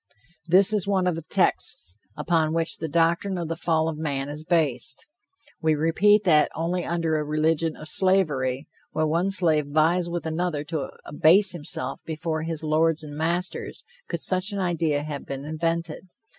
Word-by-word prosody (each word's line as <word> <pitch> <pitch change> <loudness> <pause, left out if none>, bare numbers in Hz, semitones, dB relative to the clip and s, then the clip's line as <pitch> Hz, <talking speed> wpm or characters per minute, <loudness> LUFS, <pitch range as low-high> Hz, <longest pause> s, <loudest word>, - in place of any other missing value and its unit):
This 190 +4 +5
is 200 -3 0
one 190 -2 +1
of 180 - +1
the 165 - -5
texts 90 - +1 0.2
upon 160 -2 0
which 165 0 -1
the 160 - -4
doctrine 170 +5 +1
of 170 -2 -4
the 165 - -2
fall 160 -1 0
of 155 -2 -4
man 140 -3 -3
is 150 +1 -5
based. 155 -6 -1 0.6
We 160 -1 +2
repeat 200 +7 +3
that 155 -5 +4
only 175 +2 -2
under 165 -2 -1
a - - -2
religion 155 +1 0
of 155 - -8
slavery, 150 -9 +2 0.3
where 155 - 0
one 170 +5 0
slave 160 -6 +3
vies 165 +4 +1
with 170 -1 -4
another 160 -2 -2
to 150 -2 -4 0.2
abase 180 +7 +4
himself 170 0 -4
before 160 0 -3
his 160 -1 -2
lords 160 +1 +1
and 145 -1 -9
masters, 170 +4 -3 0.2
could - - -4
such 185 +3 -1
an 200 - -4
idea 165 -6 0
have 145 -2 -6
been 135 +1 -6
invented. 165 +2 -3
160 Hz, 170 wpm, -24 LUFS, 155-175 Hz, 0.6 s, This